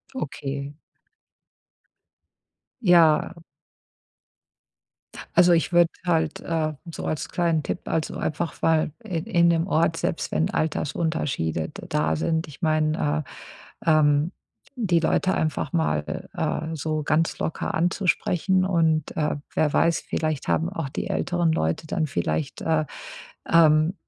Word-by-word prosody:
Okay. 140 - -4 2.1
Ja. 170 -6 +5 2.0
Also, 180 0 +6
ich 170 +1 +2
würde 170 -1 +5 0.2
halt, 160 -3 +1
äh, 160 -2 -1
so 165 - -7
als 155 - -2
kleinen 165 -3 +1
Tipp, - - -3
also, 160 -1 -2
einfach 165 +2 -3
mal 160 -1 +2
in 180 -6 -3
in 170 -6 +3
dem 165 0 +2
Ort, 165 -1 +2
selbst 165 - -2
wenn 170 +4 +1
Altersunterschiede 150 - -1
d - - -10
da 80 +1 +1
sind, 160 - -1
ich 150 +4 -13
meine, 155 -1 +1 0.6
äh, 165 - +2
ähm, 150 +1 +3 0.4
die 185 -9 +2
Leute 185 +3 +1
einfach 155 +4 -1
mal, 75 - -1
äh, 160 0 -2
so 155 +1 -2
ganz 155 +3 +1
locker - - -3
anzusprechen 185 +1 +1
und, 160 -5 +1
äh, 150 -1 0 0.2
wer 150 -2 +2
weiß, 165 -1 +2
vielleicht 155 -4 -2
haben 165 - +1
auch 165 -7 -4
die 135 - -4
älteren 175 -3 0
Leute 80 - -1
dann 155 0 -1
vielleicht, 80 - -2
äh, 160 -1 +1 0.6
ähm, 160 +1 +5
160 Hz, 125 wpm, -24 LUFS, 155-170 Hz, 2.1 s, Also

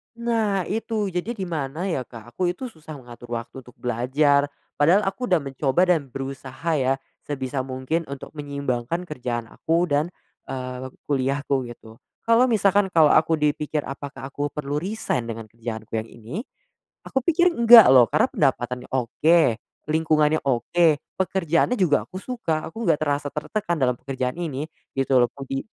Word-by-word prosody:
Nah 225 -5 0
itu. 215 -1 -2
Jadi 185 +7 -3
di 195 - -4
mana 160 -2 -3
ya 130 -7 -2
Kak, 120 0 -12
aku 180 +9 -1
itu 255 +7 -7
susah 155 -1 -11
mengatur 120 -2 -10
waktu 115 +1 -6
untuk 125 - -17
belajar. 140 +4 +2 0.3
Padahal 175 +8 +4
aku 195 +6 -2
udah 180 -4 +3
mencoba 140 +6 +1
dan 160 -6 +2
berusaha 135 +3 -6
ya, 135 0 +2 0.3
sebisa 130 -2 -3
mungkin 130 +6 -2
untuk 140 0 -7
menyeimbangkan 140 +2 -2
kerjaan 120 -5 -4
aku 170 +2 0
dan, 145 +1 +2 0.4
eee, 130 -1 -5
waktu 130 - -11
kuliahku 140 +1 0
gitu. 115 -2 -12 0.3
Kalau 230 +2 +6
misalkan 200 -4 +3
kalau 160 -4 +6
aku 160 - +4
dipikir 150 0 0
apakah 140 -1 -7
aku 145 +1 -3
perlu 145 -1 -4
resign 195 - -2
dengan 115 -1 -6
kerjaanku 115 -1 -7
yang 110 +1 -4
ini, 115 +5 -10 0.7
aku 265 - -1
pikir 345 +2 +4
enggak 235 -3 +9
loh 130 -2 +8
karena 150 - +3
pendapatannya 125 -3 0
oke, 135 +7 +3 0.5
lingkungannya 155 -1 +3
oke, 140 +7 +2 0.3
pekerjaannya 190 +4 +1
juga 160 -6 +3
aku 185 - -8
suka. 180 -12 -2
Aku 225 +8 -6
nggak 160 -4 +3
terasa 145 -1 0
tertekan 175 +3 -2
dalam 125 -1 +2
pekerjaan 130 -2 -3
ini 150 -3 -3 0.3
gitu 135 0 +2
loh, - - +1
kodi 135 -1 -5
145 Hz, 160 wpm, -24 LUFS, 130-175 Hz, 0.7 s, enggak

